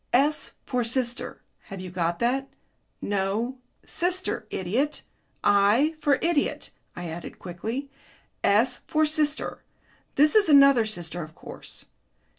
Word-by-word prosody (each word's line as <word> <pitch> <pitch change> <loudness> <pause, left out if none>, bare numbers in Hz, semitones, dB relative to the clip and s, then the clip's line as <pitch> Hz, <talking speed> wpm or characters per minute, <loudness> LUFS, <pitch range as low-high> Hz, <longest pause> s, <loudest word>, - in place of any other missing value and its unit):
"S 285 +5 +2
for 250 -1 0
sister; 240 +1 -1 0.2
have 195 -2 -8
you 185 -1 -7
got 170 -1 -1
that?... 265 +5 0 0.5
No, 205 +6 -1 0.3
sister, 365 +2 -1
idiot. 240 +12 -1 0.4
I 205 +10 +4
for 280 -3 +3
idiot," 330 -3 0 0.2
I 175 0 -5
added 165 +1 -7
quickly. 225 +10 -5 0.5
"S 230 +5 +3
for 310 0 +3
sister 305 0 0 0.5
this 300 +2 +5
is 420 -5 +5
another 275 -5 +7
sister, 175 -4 -5
of 155 0 -9
course. - - -10
245 Hz, 120 wpm, -26 LUFS, 195-290 Hz, 0.5 s, another